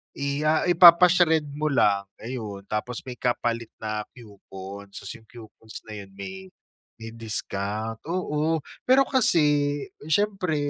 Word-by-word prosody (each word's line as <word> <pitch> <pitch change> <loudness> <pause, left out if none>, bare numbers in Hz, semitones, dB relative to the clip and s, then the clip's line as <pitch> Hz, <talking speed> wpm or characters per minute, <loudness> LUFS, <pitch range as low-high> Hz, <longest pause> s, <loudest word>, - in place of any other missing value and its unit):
i 140 0 -2
ah, 155 0 +3
ipapa-shred 175 -2 +6
mo 150 +2 -2
lang, 100 -7 +2 0.2
ayun. 110 -5 -6
Tapos 115 +3 -3
may 125 -2 -9
kapalit 120 -2 -1
na 110 -1 -4
coupon, 100 -3 -11
so, - - -8
si 100 - -8
coupons 110 -1 -12
na 110 - -12
yun 100 -1 -11
may 95 -1 -8 0.5
may 115 0 -9
discount, 110 -1 -4
oo. 160 -3 -1 0.2
Pero 265 +2 +6
kasi 150 - +2 0.3
syempre 190 -2 0
120 Hz, 130 wpm, -25 LUFS, 105-160 Hz, 0.5 s, ipapa-shred